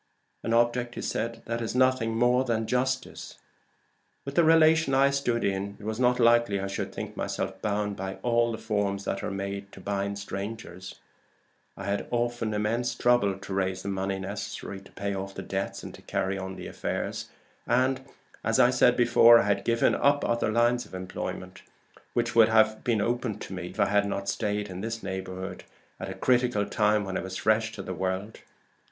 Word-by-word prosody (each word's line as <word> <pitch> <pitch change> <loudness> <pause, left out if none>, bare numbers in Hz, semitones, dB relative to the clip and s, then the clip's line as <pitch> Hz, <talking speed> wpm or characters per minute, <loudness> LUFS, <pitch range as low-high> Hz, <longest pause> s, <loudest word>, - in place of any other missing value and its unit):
"An - - -3
object 120 +1 +2 0.2
that 115 0 -3
is 115 +1 -3
nothing 130 -3 +2
more 125 +2 +4
than 115 -3 -1
justice. 130 +2 -2 0.9
With 140 - -5
the 170 - +4
relation 160 -3 +5
I 135 +1 +5
stood 125 -4 0
in, 100 +1 -2
it - - -13
was 110 +1 -3
not 125 0 +3
likely 120 -4 +4
I 95 - -3
should 95 -1 -4
think - - -6
myself - - -3
bound 105 -1 -1
by 95 0 -4
all 120 -1 +2
the 110 - -4
forms 105 -3 -1
that 100 - -2
are - - -3
made 100 0 -5
to - - -11
bind 100 +1 -2
strangers. 100 -2 -6 0.8
I - - -6
had 100 0 -2
often 120 -2 -1
immense 115 +4 0
trouble 120 -6 +3
to 95 0 -7
raise 95 -1 -1
the - - -3
money 95 0 -1
necessary 100 0 -6
to 95 - -17
pay 100 +1 -3
off 95 0 -5
debts 95 0 -4
and - - -11
carry 95 +1 -1
on 95 0 -5
the - - -8
affairs; - - -4 0.4
and, 130 +2 +2 0.4
as - - +1
I - - +6
said - - +4
before, 120 -1 +7
I - - +3
had 100 0 +1
given 115 0 +2
up 145 +1 +2
other 120 -2 +1
lines 120 +2 +2
of - - -10
advancement 95 0 -6 0.5
which 120 -1 0
would 115 -1 +6
have 110 -1 +3
been 115 -4 +1
open 120 0 -1
to - - -8
me 90 -1 -5
if 90 - -11
I - - +5
had 100 0 +2
not 100 0 -3
stayed 105 0 -1
in 95 -1 -7
this 115 +1 -4
neighborhood 95 -1 -5 0.4
at 95 - -5
a 95 - -5
critical 120 0 +2
time 105 0 +2
when 95 -1 -3
I - - -2
was 95 0 -5
fresh 110 0 +2
to 100 - -6
the 95 - -5
world. 95 +4 -3
110 Hz, 190 wpm, -27 LUFS, 100-120 Hz, 0.9 s, before